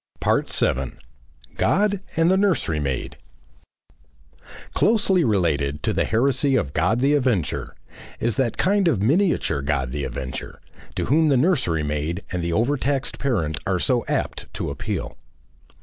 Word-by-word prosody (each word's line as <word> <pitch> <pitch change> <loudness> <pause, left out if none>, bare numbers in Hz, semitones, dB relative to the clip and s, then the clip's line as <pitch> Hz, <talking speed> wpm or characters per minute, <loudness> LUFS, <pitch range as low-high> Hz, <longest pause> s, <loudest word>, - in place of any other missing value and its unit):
7. 65 -1 0 0.6
GOD 205 +1 +2 0.2
AND 165 +2 +4
THE - - +4
NURSERY 190 - +1
MAID 70 -3 -3 1.6
Closely 200 -5 +3
related 75 - 0
to - - 0
the - - +1
Heresy 135 +4 +2
of 70 - 0
God 115 +2 +1
the 140 +2 +3
Avenger, 125 - 0 0.4
is 115 -1 0
that 130 -4 0
kind 200 -1 +2
of 145 - +2
miniature 160 - +2
God 70 -3 -1
the 70 +1 -3
Avenger, 65 -1 -6 0.4
to - - -1
whom 155 +3 +3
the 140 -3 +4
nursery 125 - +1
maid 75 +5 -2
and 90 -2 -2
the 85 - -1
overtaxed 135 +6 0
parent 90 - -1
are 95 -1 +1
so 120 +6 +1
apt - - -3
to - - -3
appeal. - - -4
120 Hz, 140 wpm, -23 LUFS, -, 1.6 s, AND